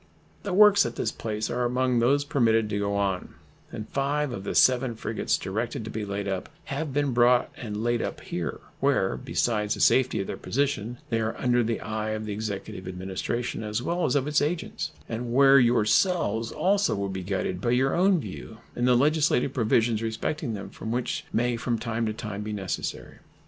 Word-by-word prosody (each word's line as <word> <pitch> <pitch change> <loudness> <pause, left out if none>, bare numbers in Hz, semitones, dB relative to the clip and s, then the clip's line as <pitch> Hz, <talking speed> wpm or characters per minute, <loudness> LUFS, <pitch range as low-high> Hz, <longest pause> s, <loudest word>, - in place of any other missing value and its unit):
The 200 - -4
works 205 +1 +7
at 120 - -4
this - - -1
place 110 -1 -3
are 125 0 0
among 125 0 +1
those 140 +5 +3
permitted 115 -6 +2
to 100 - 0
go 100 0 -1
on, 100 -2 -1 0.4
and 110 - -6
5 140 +1 0
of 100 -5 -5
the - - -3
7 125 -2 +4
frigates - - -1
directed - - -3
to - - -6
be 110 - -3
laid 100 0 -3
up 95 -1 -3 0.2
have 150 +1 -3
been 140 -1 0
brought 120 +1 +4
and 105 -2 -5
laid 120 0 +1
up - - -4
here, - - -4 0.2
where, - - +2
besides 105 - 0
the - - -9
safety 130 -4 +3
of 95 - -1
their - - -5
position, 125 -4 -1
they 115 - +2
are 110 0 -2
under 125 -1 +2
the 115 0 -1
eye 110 0 -3
of 110 - -6
the 105 - -3
Executive 100 -3 -5
Administration, 95 +6 -3
as 105 +2 -2
well 175 +4 -1
as 125 - +1
of 140 -2 +2
its 150 +1 +2
agents, 155 +1 -2 0.2
and 115 +1 -4
where 135 +2 +7
yourselves 120 - +2
also 195 - +2
will 100 0 -2
be 95 -1 -4
guided 95 -1 -2
by 120 - 0
your 130 +2 +2
own 185 +1 +4
view 110 -1 -8 0.2
in 120 - 0
the 125 -1 +5
legislative 145 -2 +2
provisions 115 -2 +2
respecting 115 +3 -2
them 100 - -7
which 120 +2 -2
may 120 +1 +1
from 115 0 -1
time 115 0 -2
to 110 - -1
time 105 -3 -5
be 105 0 -4
necessary. 95 -3 -4
120 Hz, 195 wpm, -26 LUFS, 105-130 Hz, 0.4 s, works